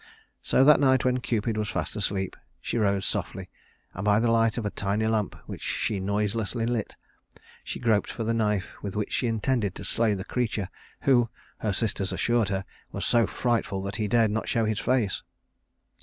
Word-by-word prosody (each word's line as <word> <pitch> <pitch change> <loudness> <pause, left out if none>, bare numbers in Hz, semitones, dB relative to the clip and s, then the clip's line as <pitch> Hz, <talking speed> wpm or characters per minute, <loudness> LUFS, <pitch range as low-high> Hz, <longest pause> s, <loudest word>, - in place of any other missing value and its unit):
So - - +3
that 150 +2 +7
night 130 -2 +4
when 125 0 +2
Cupid 115 -2 -1
was 105 -1 -1
fast - - -3
asleep, 95 -2 -2 0.2
she 120 - -2
rose 100 -2 +1
softly, - - -3 0.4
and 95 - -5
by 105 0 +4
the 115 0 +2
light 115 0 +3
of 115 - -2
a 105 - -1
tiny 100 +2 -1
lamp 110 -3 0
which - - -7
she 105 -3 -1
noiselessly 105 +2 -1
lit, 115 -3 -2 0.7
she - - -5
groped 110 -4 +2
for 115 - -4
the 115 +1 0
knife 105 -4 0
with 100 -2 -5
which 105 0 -2
she 125 - +1
intended 115 -3 0
to - - -7
slay 110 +2 +3
the 95 0 -5
creature 110 -6 -1 0.3
who 120 -4 +4 0.3
her 105 - 0
sisters 100 -2 -1
assured 120 -3 +1
her 95 -1 -2 0.3
was - - -3
so 115 -3 +3
frightful 115 -6 -1
that 100 +1 -3
he 105 - 0
dared 115 0 +3
not 110 +1 -2
show 115 -1 +2
his 110 0 0
face. 120 -7 +1
110 Hz, 190 wpm, -27 LUFS, 100-115 Hz, 0.7 s, that